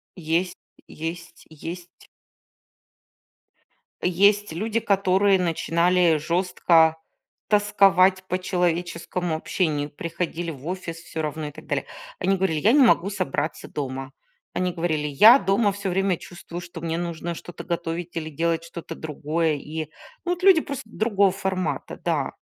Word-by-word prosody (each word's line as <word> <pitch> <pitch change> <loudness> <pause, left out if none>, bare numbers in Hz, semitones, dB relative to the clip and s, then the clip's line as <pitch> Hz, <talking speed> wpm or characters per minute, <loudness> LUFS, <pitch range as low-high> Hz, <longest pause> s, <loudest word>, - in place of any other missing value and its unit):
Есть 175 +1 -1 0.3
есть 170 +1 -7
есть. 170 +3 -9 1.9
Есть 200 +3 +3
люди, 215 +7 -1
которые 195 -1 +3
начинали 170 0 +2
жёстко 165 0 +3 0.5
тосковать 195 -3 +4
по 185 0 -1
человеческому 175 -1 -1
общению, 155 -3 -1
приходили 170 +2 -4
в 140 0 -10
офис 180 -2 -4
всё 165 -1 -6
равно 155 0 -3
и - - -7
так - - -13
далее. - - -1 0.3
Они 195 - +2
говорили: 180 -5 0
"Я 210 - +4
не 285 +1 +6
могу 195 -4 +3
собраться 160 -5 -3
дома". 135 -1 -5 0.4
Они 180 0 0
говорили: 160 -3 -1
"Я 215 - +8
дома 200 0 +2
всё 200 0 -4
время 190 0 +1
чувствую, 175 0 -9
что 175 -1 -9
мне 165 0 -2
нужно 170 0 -3
что-то 175 - -9
готовить 170 0 -4
или 160 -1 -3
делать 165 +2 -1
что-то 170 0 -8
другое". 155 +1 -1
И, 155 +1 -6 0.3
ну 355 - 0
вот, 360 +1 -8
люди 375 -4 +7
просто 280 -4 -6
другого 205 -3 +2
формата, 190 -3 -3
да. - - 0
175 Hz, 135 wpm, -24 LUFS, 160-190 Hz, 1.9 s, Я